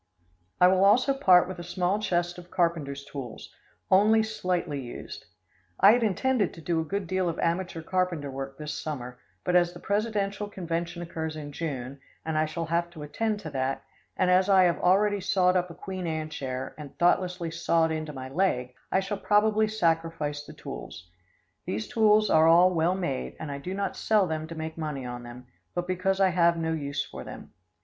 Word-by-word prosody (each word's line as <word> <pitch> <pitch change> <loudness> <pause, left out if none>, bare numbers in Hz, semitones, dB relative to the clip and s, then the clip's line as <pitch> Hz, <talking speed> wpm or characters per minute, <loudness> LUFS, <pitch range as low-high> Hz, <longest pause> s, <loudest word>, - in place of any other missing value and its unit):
I 180 - +7
will 185 +1 +4
also 245 +7 +5
part 185 -10 +5
with 185 -1 -7
a - - -6
small 180 +3 0
chest 175 -3 -1
of 175 0 -13
carpenter's 155 -6 -1
tools, 135 -6 -8 0.4
only 215 +4 +5
slightly 180 -8 -2
used. 120 -2 -8 0.5
I 195 +2 +8
had 240 +2 +3
intended 225 -1 +1
to - - -11
do 165 +1 0
a - - -2
good 195 +4 -3
deal 185 0 0
of 165 - -4
amateur 170 -1 -1
carpenter 175 -5 -1
work 135 0 -6
this 150 0 -5
summer, 125 -5 -5 0.2
but, 180 - 0
as 175 -1 +4
the 175 - -10
presidential 205 0 -1
convention 170 -2 -4
occurs 160 -2 -4
in 150 -1 -7
June, 140 -4 -5 0.3
and 160 -1 -2
I 155 0 +2
shall 165 +2 -4
have 170 +1 0
to 155 -3 -8
attend 210 +7 -2
to 155 -5 -7
that, 135 0 -2 0.3
and 185 -1 +3
as 185 +2 +4
I 190 -1 +6
have 175 -1 +2
already 200 +2 +3
sawed 185 -1 +2
up 180 0 +1
a 170 - -10
Queen 185 -2 -5
Anne 155 -1 -3
chair, 130 -3 -4
and 145 -2 -10
thoughtlessly 175 -1 +1
sawed 165 -1 +1
into 155 -1 -3
my 130 -2 -7
leg, 130 -5 0 0.2
I 190 - +3
shall 195 +1 -4
probably 215 +1 +3
sacrifice 165 -7 -1
the - - -11
tools. 90 +1 -9 0.6
These 110 +3 -3
tools 215 -1 +4
are 160 0 +6
all 175 +3 +6
well 170 +2 +2
made, 65 - -3
and 155 -2 -5
I 140 - -5
do 180 +7 -5
not 195 -2 -2
sell 215 -3 +2
them 160 -2 -3
to 165 - -8
make 160 0 -6
money 150 -5 -4
on 120 0 -6
them, 120 +1 -10 0.3
but 175 0 -1
because 185 +1 0
I 190 -1 +5
have 170 -1 +3
no 160 0 -1
use 140 -3 -2
for - - -9
them. - - -10
170 Hz, 200 wpm, -27 LUFS, 155-190 Hz, 0.6 s, I